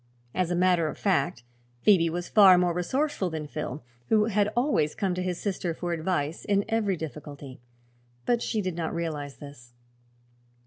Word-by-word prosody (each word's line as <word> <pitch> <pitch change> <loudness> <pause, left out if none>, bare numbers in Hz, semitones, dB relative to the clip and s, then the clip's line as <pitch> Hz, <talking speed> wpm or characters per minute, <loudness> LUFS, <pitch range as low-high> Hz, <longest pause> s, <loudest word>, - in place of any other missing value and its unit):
As 180 -2 0
a 175 - 0
matter 180 -2 +3
of - - -5
fact 140 - 0 0.4
Phoebe 175 -5 +5
was 175 +2 -4
far 195 -4 +7
more 175 -1 +2
resourceful 200 - -1
than 160 -2 -4
Phil, 150 -1 -5 0.3
who 215 -1 +4
had 210 -2 +2
always 240 - +1
come 190 -3 -1
to 180 - -3
his 180 -1 -2
sister 180 -4 -2
for 175 0 -3
advice 165 -2 -2
in 200 0 +1
every 220 -4 0
difficulty. 145 -4 -8 0.6
But 240 -1 +2
she 215 -3 -1
did 185 -2 -3
not 170 -1 -3
realize 150 -4 -4
this. 130 -5 -12
175 Hz, 170 wpm, -27 LUFS, 155-195 Hz, 0.6 s, far